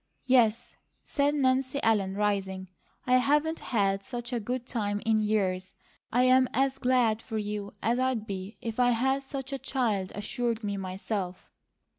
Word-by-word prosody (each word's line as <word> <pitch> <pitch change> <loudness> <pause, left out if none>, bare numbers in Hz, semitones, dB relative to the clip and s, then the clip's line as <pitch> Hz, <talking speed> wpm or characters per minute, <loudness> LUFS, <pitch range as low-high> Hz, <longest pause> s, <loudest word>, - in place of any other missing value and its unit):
"Yes," 240 -4 +3 0.3
said 285 0 +1
Nancy 265 0 +1
Ellen, 200 -4 +2
rising, 195 -2 -1 0.4
"I 255 0 +5
haven't 300 +5 +2
had 195 -4 0
such 240 0 -6
a 240 - 0
good 245 +3 -3
time 205 -5 -2
in 220 -1 +3
years. 190 -3 0 0.4
I'm 255 +2 +5
as 270 +1 +1
glad 245 -4 +2
for 220 - -5
you 210 -1 -4
as 235 +2 +2
I'd 255 -4 0
be 195 +1 -6
if 230 0 -4
I 245 0 +5
had 265 +3 +1
such 270 0 -6
a 275 - -3
child 215 -10 -1
assured 230 +2 -2
me, 205 -1 -2
myself." 190 0 -4
230 Hz, 155 wpm, -28 LUFS, 205-255 Hz, 0.4 s, I